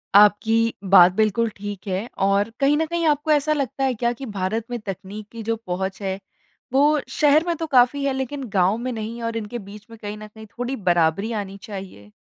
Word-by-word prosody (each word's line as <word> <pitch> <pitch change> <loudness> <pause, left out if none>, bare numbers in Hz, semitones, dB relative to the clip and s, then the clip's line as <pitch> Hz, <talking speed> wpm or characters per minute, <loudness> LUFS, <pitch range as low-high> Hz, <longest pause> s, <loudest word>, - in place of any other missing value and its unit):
आपकी 225 +3 +5 0.2
बात 180 -2 +8
बिल्कुल 220 +3 +1
ठीक 205 0 -7
है। 190 +4 -2 0.2
और 200 +2 +2
कहीं 280 +1 +4
न 320 - +1
कहीं 340 +1 -2
आपको 300 +1 +1
ऐसा 300 0 +3
लगता 275 -2 -2
है 265 -1 +2
क्या 235 +1 0
कि 265 +3 -8
भारत 210 +1 -2
में 240 - -2
तकनीक 205 0 -7
की 230 -1 -7
जो 230 +1 0
पहुँच 190 +2 -3
है, 190 -1 -2 0.6
वो 295 +3 +4
शहर 300 +1 +4
में 340 - +1
तो 325 - -3
काफ़ी 265 +1 +4
है 275 - +1
लेकिन 265 +1 -4
गाँव 195 +1 +2
में 250 +2 -3
नहीं 225 0 -5
और 230 0 -2
इनके 225 +2 -5
बीच 205 +1 -12
में 230 - -12
कहीं 210 0 -6
न 215 0 -9
कहीं 220 +1 -13
थोड़ी 245 +2 -2
बराबरी 175 +1 +1
आनी 195 0 -8
चाहिए? 190 - -9
220 Hz, 210 wpm, -23 LUFS, 200-265 Hz, 0.6 s, बात